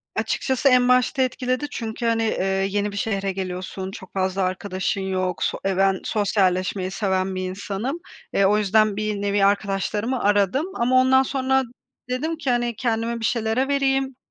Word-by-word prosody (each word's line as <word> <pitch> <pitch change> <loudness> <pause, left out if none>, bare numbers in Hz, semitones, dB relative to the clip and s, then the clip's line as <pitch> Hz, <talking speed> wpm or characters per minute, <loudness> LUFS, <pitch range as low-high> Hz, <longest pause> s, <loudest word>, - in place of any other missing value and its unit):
Açıkçası 265 +1 +1
en 250 -1 +4
başta 250 +2 +3
etkiledi. 255 +1 -1
Çünkü, 230 -1 -4
hani, 230 -1 +2
eee, 215 -4 0 0.2
yeni 205 +1 -1
bir 200 - -7
şehre 195 -2 -1
geliyorsun, 185 0 -5
çok 190 -1 -11
fazla 190 0 -1
arkadaşın 185 +1 -2
yok; 185 -2 -2
so, - - -1
eee, 195 -1 0
ben 195 -1 +3
sosyalleşmeyi 190 -2 0
seven 190 -2 -1
bir 185 0 -3
insanım. 205 - -4 0.3
Eee, 195 - +3
o 205 +2 +4
yüzden 215 0 +3
bir 210 -1 -2
nevi 200 0 +2
arkadaşlarımı 205 +4 0
aradım 205 - +2
ama 245 +2 +1
ondan 260 +1 +5
sonra 265 0 +1 0.5
dedim 310 +6 -2
ki, 275 -4 -3
hani, 240 -1 0
kendimi 230 0 -1
bir 225 - -2
şeylere 230 +3 0
vereyim, 270 -1 +1
210 Hz, 165 wpm, -23 LUFS, 195-250 Hz, 0.5 s, ondan